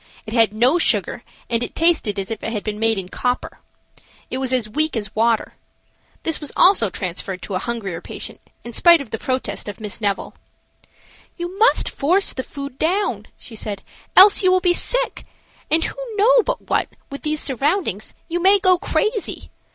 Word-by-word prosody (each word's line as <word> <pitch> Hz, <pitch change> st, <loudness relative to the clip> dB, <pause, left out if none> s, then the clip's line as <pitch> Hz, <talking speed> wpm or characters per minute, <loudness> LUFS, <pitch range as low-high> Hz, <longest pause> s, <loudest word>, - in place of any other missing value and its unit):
It 215 Hz, -, -7 dB
had 225 Hz, -3 st, +4 dB
no 245 Hz, +10 st, +3 dB
sugar, -, -, 0 dB, 0.3 s
and 230 Hz, 0 st, -1 dB
it 240 Hz, -, -4 dB
tasted 320 Hz, -, +2 dB
as 195 Hz, +2 st, -4 dB
if 220 Hz, -, -4 dB
it 225 Hz, -, -3 dB
had 210 Hz, -3 st, -3 dB
been 210 Hz, -1 st, -4 dB
made 225 Hz, -1 st, +2 dB
in 190 Hz, -2 st, -4 dB
copper. 245 Hz, +6 st, -3 dB, 0.7 s
It 255 Hz, -, -2 dB
was 260 Hz, -1 st, -1 dB
as 250 Hz, -4 st, +1 dB
weak 305 Hz, +5 st, +1 dB
as 205 Hz, -1 st, -4 dB
water. 225 Hz, +1 st, +1 dB, 0.7 s
This 325 Hz, -, 0 dB
was 295 Hz, -, -3 dB
also 360 Hz, -, +5 dB
transferred 185 Hz, +1 st, -5 dB
to 200 Hz, -, -6 dB
a 185 Hz, -, 0 dB
hungrier 200 Hz, -8 st, -4 dB
patient, -, -, -7 dB, 0.2 s
in 240 Hz, -, -8 dB
spite 340 Hz, +6 st, +6 dB
of 275 Hz, -6 st, -8 dB
the 225 Hz, -, -3 dB
protest 255 Hz, -7 st, -3 dB
of 205 Hz, -, -7 dB
Miss 215 Hz, 0 st, -7 dB
Neville. 200 Hz, -2 st, -2 dB, 1.0 s
"You 350 Hz, +1 st, -5 dB
must 460 Hz, +3 st, +4 dB
force 360 Hz, +8 st, +2 dB
the 260 Hz, -, -3 dB
food 280 Hz, 0 st, -8 dB
down," 375 Hz, +6 st, 0 dB
she 230 Hz, -, -10 dB
said, 205 Hz, -2 st, -5 dB, 0.3 s
"else 395 Hz, +2 st, +8 dB
you 370 Hz, -, +4 dB
will 370 Hz, -, +4 dB
be 360 Hz, -1 st, +2 dB
sick, -, -, -1 dB, 0.5 s
and 320 Hz, +1 st, +3 dB
who -, -, -4 dB, 0.2 s
know 485 Hz, +5 st, +5 dB
but -, -, -4 dB
what, -, -, +1 dB, 0.2 s
with 280 Hz, -, -7 dB
these 305 Hz, 0 st, -1 dB
surroundings, 275 Hz, -, -1 dB
you 345 Hz, +1 st, -2 dB
may 390 Hz, +3 st, +6 dB
go 370 Hz, -2 st, +3 dB
crazy. 430 Hz, +2 st, -2 dB
260 Hz, 190 wpm, -20 LUFS, 215-350 Hz, 1.0 s, else